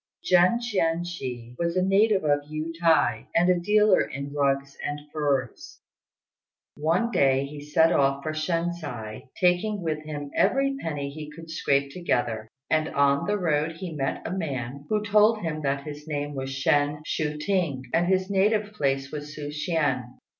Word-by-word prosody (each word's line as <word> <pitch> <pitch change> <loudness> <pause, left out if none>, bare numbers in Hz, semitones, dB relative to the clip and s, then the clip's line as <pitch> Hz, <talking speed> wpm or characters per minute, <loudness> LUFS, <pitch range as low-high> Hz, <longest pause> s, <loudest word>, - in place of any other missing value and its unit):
Jen 180 +6 +4
Chien 175 -8 0
chih 125 -9 -6
was 170 +1 0
a 185 - +3
native 195 +1 +3
of 145 -1 +3
Yü 155 +2 -4
t'ai, 160 -10 +2
and 175 +2 +5
a 180 - +2
dealer 210 +2 +4
in 140 +1 -5
rugs 140 -1 0
and 145 0 -3
furs. 140 -5 -2 1.0
One 165 +10 +1
day 135 - +3
he 145 +1 -8
set 160 +3 +3
off 140 0 +2
for 155 - -2
Shensi, 155 -9 -3
taking 185 +3 +2
with 155 -2 -2
him 145 -2 -6
every 275 +1 +2
penny 145 -3 -3
he 150 +1 -8
could 165 +1 -11
scrape 140 -3 +1
together; 120 -10 -1 0.2
and 155 0 +1
on 140 +2 +2
the 205 0 +1
road 160 -3 0
he 175 0 -6
met 135 -3 -3
a - - -3
man 140 -6 -4
who 210 -1 0
told 215 +1 +4
him 155 -2 -3
that 140 -1 -1
his 150 +1 -8
name 145 -1 -3
was 135 -1 -4
Shên 145 +2 +1
Chu 150 -1 -2
t'ing, 160 -6 -1
and 175 +1 +2
his 185 0 +2
native 205 +2 +1
place 135 -6 -1
Su 150 0 -6
ch'ien. 145 -6 -1
155 Hz, 165 wpm, -26 LUFS, 140-180 Hz, 1.0 s, and